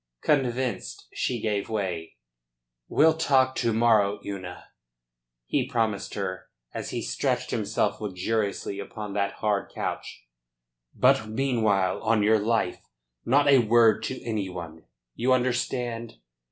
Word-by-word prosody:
Convinced, 125 -6 -1
she 120 - -1
gave 105 -2 -2
way. 95 -7 -3 0.7
"We'll 160 +1 +4
talk 135 -5 +3
to 115 - +1
morrow, 110 -3 +3
Una," 95 -3 -7 0.8
he 130 - 0
promised 115 -6 -1
her, 95 -2 -4 0.2
as - - -5
he - - -3
stretched - - -1
himself - - -1
luxuriously 100 0 -2
upon 105 0 -6
that 100 0 0
hard 105 -2 -1
couch. - - -5 0.7
"But 130 -3 +3
meanwhile, 110 -6 +1
on 110 -1 +2
your 110 +1 +4
life, 105 -4 0 0.4
not 145 +4 +4
a 140 -2 +7
word 115 -1 +4
to 130 - -4
any 105 -5 -2
one. 85 -3 -8 0.3
You 130 +2 +2
understand?" 120 -2 -1
110 Hz, 125 wpm, -26 LUFS, 100-125 Hz, 0.8 s, a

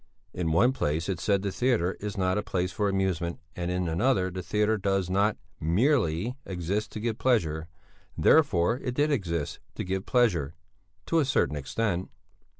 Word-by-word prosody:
In 85 -3 -1
one 115 +11 +4
place 80 - -1
it 95 -4 -2
said 100 +2 +1
the 100 - -1
theatre 110 -6 +1
is 105 +1 -5
not 95 -1 +1
a - - 0
place 90 -2 -2
for 105 -1 0
amusement 95 -3 -1 0.2
and 85 0 -3
in 90 0 -1
another 95 +2 +1
the 90 +1 -4
theatre 105 +5 +1
does 95 -2 0
not 100 +3 +2 0.2
"merely" 100 - +1
exist 95 +4 -3
to - - -4
give 115 +1 -2
pleasure, 80 -11 +1 0.5
therefore 120 - +4
it 125 -2 -4
did 150 +2 +2
exist 85 - -2 0.2
to - - -3
give 95 +1 -3
pleasure 90 - +2 0.5
to 165 - +2
a - - +4
certain 130 - +1
extent. 90 +6 -2
95 Hz, 170 wpm, -28 LUFS, 85-110 Hz, 0.5 s, one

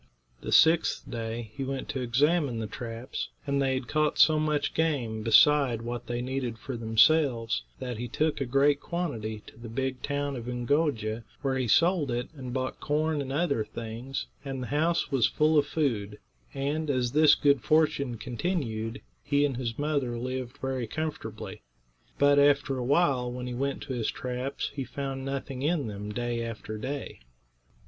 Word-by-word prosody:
The - - -5
sixth 160 +1 +4
day 115 -1 -4
he 135 - -4
went 135 0 -3
to 130 - -2
examine 140 +2 +2
the 110 - -2
traps, 115 +3 -5 0.2
and 140 -1 +1
they 135 -1 +2
had 130 -1 -3
caught 155 0 +1
so 155 -1 +6
much 150 -2 0
game, 130 -9 0
beside 120 +1 +5
what 120 0 -5
they 120 0 -2
needed 130 -3 -3
for 130 +3 -6
themselves, 115 - +3 0.2
that 125 -3 -5
he 120 - -3
took 155 +4 0
a 135 - -1
great 140 +3 +3
quantity 115 -13 -3
to - - -15
the 115 -1 -8
big 130 +2 -2
town 145 -1 -2
of 120 -1 -6
Oongoo'ja, 120 -3 0 0.2
where 135 -1 +1
he 130 -2 0
sold 165 - +3
it 120 +1 -2
and 130 -3 -6
bought 130 +1 -3
corn 150 0 0
and 135 -1 -5
other 140 -6 +1
things, 115 +5 -5 0.2
and 135 -2 -4
the - - -5
house 165 +3 +1
was 130 -5 +4
full 155 +1 +2
of 145 -1 +4
food; 115 -9 -1 0.4
and, 145 +3 -1
as 125 -3 +1
this 155 +1 +6
good 140 -3 +3
fortune 145 -5 +2
continued, 120 - -3 0.2
he 145 0 +2
and 135 -4 -1
his 115 -3 -3
mother 145 -5 -1
lived 130 +1 -4
very 130 -3 -2
comfortably. 155 +6 -5 0.6
But 145 0 +5
after 140 -1 +4
a 125 - -2
while, 135 -3 +2
when 125 0 -5
he 125 - -4
went 135 +3 -2
to 130 - -5
his 120 -3 -1
traps 125 +2 -3
he 140 -1 -3
found 135 +1 -4
nothing 135 -1 -4
in 150 0 +1
them 105 -1 -5
day 120 +1 -2
after 110 -1 -6
day. 135 +4 -5
130 Hz, 175 wpm, -28 LUFS, 120-145 Hz, 0.6 s, so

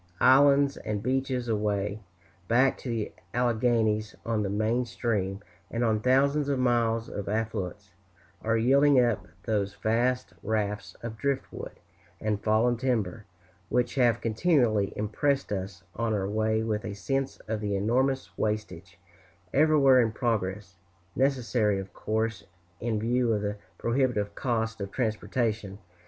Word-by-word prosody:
Islands 140 +1 +5
and 105 -1 -4
beaches, 130 0 -1
away 105 -1 -1 0.5
back 130 +3 +4
to 130 - -6
the 115 -3 -2 0.2
Alleghanies 110 -3 +1
on 115 -1 0
the 100 - -1
main 110 +4 +1
stream, 105 -5 -2 0.3
and 115 +1 -1
on 110 -2 +2
thousands 140 +4 +2
of 140 - +1
miles 115 -2 +1
of 100 -1 -5
affluents, 105 -3 -3 0.5
are 115 +1 +1
yielding 135 +4 +5
up 115 -6 +1 0.2
those 100 -3 -1
vast 115 0 0
rafts 105 0 -2
of 115 -1 -5
drift 140 -1 0
wood - - -7 0.5
and 105 -1 -1
fallen 115 +3 +3
timber, 110 -5 -1 0.4
which 125 -1 +1
have 120 -3 +3
continually 115 - +2
impressed 135 +7 0
us 95 -2 -4
on 115 -1 0
our 95 -2 -1
way 110 +1 0
with 110 -1 -1
a 100 - -5
sense 135 +6 -2
of 110 -1 -2
the 100 -1 -1
enormous 130 +7 0
wastage 95 -5 -3 0.6
everywhere 140 -3 +5
in 115 -2 +1
progress 105 -6 -2 0.4
necessary, 120 -6 +1
of 95 -1 -7
course, 110 -4 -2 0.4
in 115 -2 -1
view 120 +2 +1
of 105 -2 0
the 105 0 -2 0.2
prohibitive 115 -5 0
cost 115 -2 -2
of 100 0 -4
transportation. 110 -3 -1
110 Hz, 140 wpm, -28 LUFS, 105-125 Hz, 0.6 s, Islands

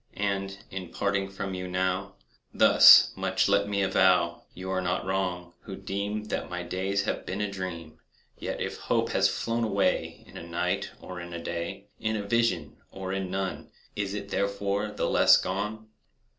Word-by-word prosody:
And, 100 -1 -2
in 95 -3 -6
parting 100 +1 -1
from 95 0 -5
you 90 0 -4
now, 95 +2 -1 0.4
Thus - - +8
much - - +1
let 100 0 +2
me 100 -1 +1
avow— 90 -3 +3
You 95 +1 -5
are 95 -1 0
not 90 0 -1
wrong, 90 -2 -2
who 95 - -8
deem 100 +2 -3
That 105 - -4
my 90 0 -4
days 95 +3 -1
have - - -2
been 95 - -4
a 105 -1 -1
dream; 85 -5 -6 0.4
Yet - - -5
if - - -3
hope - - 0
has - - +3
flown 115 0 -1
away 110 - 0
In - - -12
a - - -7
night, 85 +1 -1
or 90 -1 -7
in 85 0 -8
a 85 - -4
day, 85 +4 -5
In 110 0 -1
a 105 - -2
vision, 100 -10 0
or 95 -1 -5
in 95 -1 -2
none, 95 0 -3 0.3
Is 100 -1 -2
it 100 -1 -6
therefore 100 +1 -1
the 105 - -2
less - - +6
gone? 105 +3 -3
95 Hz, 180 wpm, -28 LUFS, 90-100 Hz, 0.4 s, Thus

